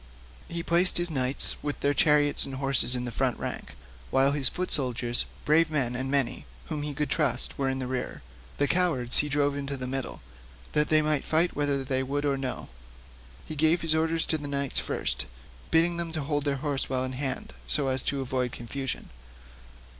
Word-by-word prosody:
He 170 0 -4
placed 175 +2 +5
his 175 -1 +1
knights 130 -2 0
with 145 -1 -4
their 145 0 +2
chariots 150 -1 +4
and 135 - -4
horses 130 -2 +6
in 125 0 -3
the 120 - -5
front 130 0 -1
rank, - - -6 0.3
while 135 +1 +3
the 145 0 -2
foot 180 +7 0
soldiers, 120 -3 0 0.2
brave 160 +2 +3
men 130 -6 -1
and 130 +2 -3
many, 135 - -1 0.2
whom 150 - -3
he 145 -1 -5
could 145 -1 -2
trust, 150 -3 +2
were 135 -1 0
in 130 - -2
the 130 - -3
rear. 125 - -5 0.3
The 145 - +1
cowards 160 -10 +4
he 150 - +1
drove 145 0 0
into 140 0 -4
the 130 - -5
middle, 135 0 -5 0.5
that 150 0 +1
they 155 0 +4
might 150 -2 +1
fight 165 +3 +1
whether 140 -2 -1
they 130 0 -1
would 140 +2 -3
or 140 -1 +1
no. 135 -2 -5 0.8
He 155 - -7
gave 160 +3 +2
his 165 -1 +2
orders 160 +1 0
to 160 - 0
the 145 - -7
knights 140 -1 0
first, - - -2 0.4
bidding 170 +1 +2
them 170 -1 -3
hold 145 -2 -2
their 140 -1 0
horses 140 0 -1
well 130 -1 -1
in 130 0 -4
hand, 130 0 -4
so 145 -2 +2
as 130 -1 +1
to 140 +1 -2
avoid 130 -1 -2
confusion. 135 +3 -5
140 Hz, 200 wpm, -27 LUFS, 130-155 Hz, 0.8 s, horses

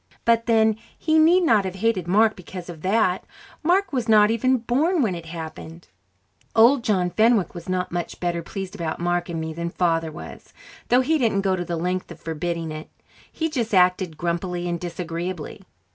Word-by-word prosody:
But 230 0 +3
then, 220 -2 +3 0.2
he 315 0 +2
need 345 +4 +5
not 220 - +4
have 190 -1 -4
hated 195 -3 0
Mark 215 +4 +4
because 180 0 -9
of 165 -3 -9
that; 190 -1 +1 0.4
Mark 360 +2 +2
was 245 -3 -1
not 210 -1 +6
even 255 +3 +2
born 280 +8 +1
when 210 -5 0
it 170 -1 -7
happened. 165 0 -8 0.7
Old 240 +3 +5
John 185 -6 +1
Fenwick 220 0 +3
was 170 0 -9
not 185 0 -1
much 175 0 -4
better 175 -1 -1
pleased 190 +2 -6
about 170 -6 -3
Mark 175 0 -1
and 165 -1 -3
me 160 0 -4
than 170 +1 -4
Father 165 -2 0
was, - - -11 0.3
though 250 +1 +5
he 310 +4 +1
didn't 220 -6 +2
go 190 -1 +1
to 175 - -3
the 170 -1 -3
length 180 +2 -2
of 170 - -11
forbidding 165 0 -3
it; 155 0 -8 0.4
he 320 - -2
just 240 -9 -2
acted 180 -3 +3
grumpily 175 +1 -2
and 170 -1 -2
disagreeably. 175 -1 -5
185 Hz, 190 wpm, -23 LUFS, 170-230 Hz, 0.7 s, not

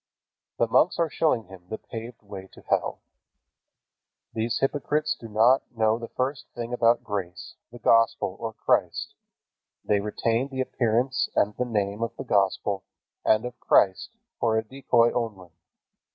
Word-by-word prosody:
The - - +3
monks 160 +9 +3
are 165 -3 +1
showing 140 -8 +1
him 95 -2 -14
the 110 - -3
paved 115 0 -9
way 100 -2 -9
to - - -14
hell. - - -1 1.3
These 115 +1 -1
hypocrites 150 +2 0
do 115 - -8
not 115 +5 +4 0.2
know 110 +1 +2
the 115 - -6
first 135 +4 -3
thing 120 0 -5
about 120 -1 +3
grace, 95 -4 -5 0.2
the 120 - -10
Gospel, 115 -5 +3
or 115 - -3
Christ. - - 0 0.7
They 105 - +2
retain 115 +4 0
the 135 -2 -7
appearance 125 0 +1
and 105 +1 +2
the 125 - -1
name 105 -2 -1
of 115 - -2
the - - -5
Gospel 100 -3 +1 0.4
and 110 +2 +3
of 125 0 -7
Christ 95 -2 +3 0.3
for 110 -1 +2
a 110 - +1
decoy 120 -1 +2
only. 105 -7 -4
115 Hz, 150 wpm, -26 LUFS, 105-125 Hz, 1.3 s, not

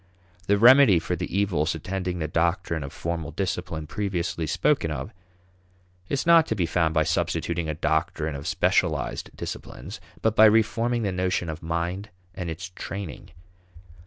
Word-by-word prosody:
The 100 - +4
remedy 125 -2 +7
for 80 - -2
the - - -4
evils 85 -6 +1
attending 90 +2 -3
the 80 -2 -2
doctrine 85 +1 0
of 70 - -7
formal 85 -2 -4
discipline 85 -2 -3
previously 85 -3 -2
spoken 80 - +1
of, 65 -3 -5 1.0
is 140 - -1
not 170 -1 +6
to 110 - -1
be 90 -4 +1
found 80 -2 0
by 80 - +4
substituting 85 +1 -1
a 75 - -2
doctrine 80 0 -1
of 70 +1 -6
specialized - - 0
disciplines, - - -7 0.2
but 110 -1 +2
by 110 - +8
reforming 115 +2 +3
the 100 - 0
notion 90 -2 -1
of 80 0 -6
mind 85 +5 -3 0.2
and 90 -2 -5
its 90 +3 -6
training. 95 -2 -7
90 Hz, 155 wpm, -25 LUFS, 80-100 Hz, 1.0 s, by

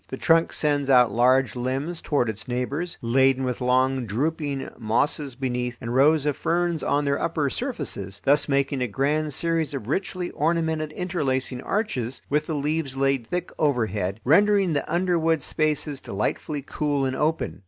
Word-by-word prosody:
The - - -6
trunk 165 0 +3
sends 145 -2 0
out 125 -4 +6
large 125 +2 +3
limbs 135 +7 -2
toward 140 -5 +1
its 110 +2 -5
neighbors, 140 +8 -3
laden 130 +2 +3
with 125 -1 -2
long 130 0 +2
drooping 140 +4 -2
mosses 130 +5 0
beneath 125 -2 -3
and 115 +1 -4
rows 145 +3 +4
of 145 -2 +1
ferns 170 -1 0
on 145 +1 +1
their 140 0 0
upper 150 -4 0
surfaces, 135 - -4
thus 145 +2 +3
making 140 -1 +1
a 125 - +1
grand 150 +7 0
series 165 0 0
of 115 -6 -6
richly 180 +4 -2
ornamented 160 -1 0
interlacing 135 -8 -1
arches, 135 - -2
with 150 +1 +1
the 160 - -2
leaves 145 -1 -2
laid 135 -3 +1
thick 180 +6 -3
overhead, 110 - 0
rendering 195 +4 +4
the 145 - -2
underwood 170 -2 +2
spaces 150 -2 -1
delightfully 135 +8 -3
cool 145 -2 -1
and 130 0 -1
open. 150 - -1
140 Hz, 160 wpm, -24 LUFS, 125-160 Hz, -, out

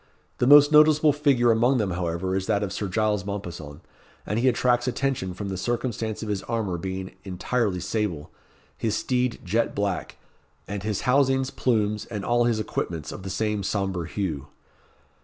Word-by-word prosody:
The 125 - +2
most 145 +1 +8
noticeable 150 0 +6
figure 135 -5 +3
amongst 120 +4 +3
them, 105 -5 0
however, 85 +1 -2
is 95 0 -2
that 105 -2 +1
of 100 -1 -3
Sir 100 - -3
Giles 105 0 0
Mompesson; 85 -7 -6 0.4
and 105 +3 -1
he 130 - +2
attracts 125 0 +2
attention 125 -8 -1
from 100 +1 -5
the 95 - -3
circumstance 115 0 -2
of 110 - -5
his 100 -2 -1
armour 110 -7 -2
being 95 +1 -5
entirely 100 +1 -1
sable, 90 -7 -3 0.4
his 110 -2 -1
steed 125 -1 0
jet 110 +6 0
black, 100 -2 -2 0.5
and 100 -1 -4
his 105 0 -2
housings, 135 0 +2
plumes, 105 -4 0
and 105 -3 -5
all 120 0 +2
his 115 -2 +1
equipments 85 -7 -3
of - - -8
the 95 - -6
same 105 +2 -1
sombre 95 -4 -2
hue. 80 -7 -3
105 Hz, 170 wpm, -25 LUFS, 95-120 Hz, 0.5 s, most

